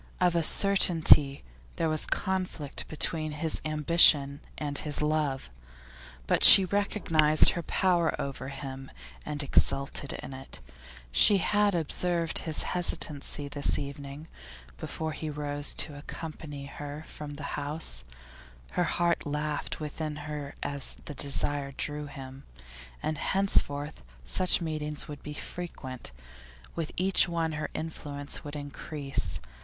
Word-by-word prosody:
Of 180 Hz, -1 st, +2 dB
a 170 Hz, -, +2 dB
certainty 160 Hz, -, +4 dB, 0.3 s
there 165 Hz, -, -1 dB
was 155 Hz, -1 st, -1 dB
conflict 185 Hz, -7 st, -1 dB
between 155 Hz, 0 st, -1 dB
his 155 Hz, +1 st, -2 dB
ambition 150 Hz, -2 st, +4 dB, 0.2 s
and 145 Hz, -2 st, -4 dB
his 150 Hz, -2 st, +1 dB
love, 150 Hz, -, -1 dB, 0.7 s
but -, -, +1 dB
she 195 Hz, -, +12 dB
recognised 165 Hz, -6 st, +5 dB
her 170 Hz, -, -4 dB
power 175 Hz, 0 st, 0 dB
over 140 Hz, -1 st, -5 dB
him 135 Hz, -1 st, -8 dB, 0.4 s
and 150 Hz, -1 st, -1 dB
exulted 140 Hz, 0 st, 0 dB
in 135 Hz, -, -8 dB
it. 130 Hz, -, -8 dB, 0.5 s
She 200 Hz, -, +6 dB
had 205 Hz, +1 st, +1 dB
observed 170 Hz, +1 st, -1 dB
his 160 Hz, -2 st, -3 dB
hesitancy 150 Hz, -4 st, -3 dB
this 140 Hz, 0 st, +1 dB
evening, 140 Hz, +2 st, -7 dB, 0.5 s
before 160 Hz, -, -5 dB
he 155 Hz, 0 st, -6 dB
rose 145 Hz, -1 st, 0 dB
to 150 Hz, -, -2 dB
accompany 150 Hz, -1 st, -8 dB
her 145 Hz, +2 st, -8 dB
from 145 Hz, -1 st, -9 dB
the 145 Hz, -, -9 dB
house; 145 Hz, -, -3 dB, 0.7 s
her 175 Hz, -, 0 dB
heart 170 Hz, 0 st, 0 dB
laughed 150 Hz, 0 st, -3 dB
within 155 Hz, 0 st, -5 dB
her 150 Hz, -2 st, -6 dB
as 140 Hz, -1 st, -3 dB
the -, -, -7 dB
desire 140 Hz, 0 st, 0 dB
drew 150 Hz, +1 st, -4 dB
him. 135 Hz, -1 st, -10 dB, 0.6 s
And 155 Hz, -1 st, -2 dB
henceforth 150 Hz, -7 st, 0 dB, 0.2 s
such 180 Hz, -, +2 dB
meetings 150 Hz, -2 st, -3 dB
would 145 Hz, -1 st, -9 dB
be 150 Hz, -, -8 dB
frequent, 130 Hz, -, -7 dB, 0.6 s
with 165 Hz, -2 st, -4 dB
each 190 Hz, 0 st, +4 dB
one 165 Hz, -1 st, -1 dB
her 150 Hz, 0 st, -4 dB
influence 145 Hz, -3 st, -5 dB
would 145 Hz, -1 st, -8 dB
increase. 145 Hz, -, -3 dB
150 Hz, 130 wpm, -28 LUFS, 145-165 Hz, 0.7 s, she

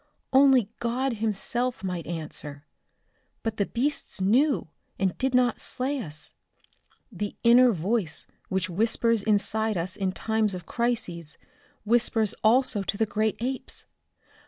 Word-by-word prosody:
Only 265 Hz, -5 st, +6 dB
God 240 Hz, +1 st, -1 dB
Himself 225 Hz, +3 st, -1 dB
might 180 Hz, -3 st, -4 dB
answer. 150 Hz, -3 st, -6 dB, 0.8 s
But 225 Hz, -1 st, -2 dB
the 200 Hz, -, 0 dB
beasts 275 Hz, 0 st, -2 dB
knew, 240 Hz, -, +2 dB, 0.3 s
and 190 Hz, -2 st, 0 dB
did 260 Hz, -1 st, +1 dB
not 250 Hz, -2 st, +2 dB
slay 270 Hz, +3 st, -2 dB
us. 155 Hz, -8 st, -7 dB, 0.8 s
The 205 Hz, +1 st, -4 dB
inner 240 Hz, +1 st, +7 dB
voice 190 Hz, -2 st, -1 dB, 0.2 s
which 190 Hz, -1 st, 0 dB
whispers 225 Hz, +4 st, +2 dB
inside 215 Hz, 0 st, +1 dB
us 175 Hz, +2 st, -2 dB
in 190 Hz, -2 st, -1 dB
times 220 Hz, 0 st, 0 dB
of 180 Hz, -2 st, -8 dB
crises, 225 Hz, -11 st, 0 dB, 0.5 s
whispers 225 Hz, -2 st, +2 dB
also 225 Hz, -1 st, +4 dB
to 195 Hz, +1 st, -2 dB
the 220 Hz, -, +2 dB
great 215 Hz, 0 st, 0 dB
apes! 255 Hz, +2 st, -4 dB
220 Hz, 130 wpm, -26 LUFS, 190-240 Hz, 0.8 s, inner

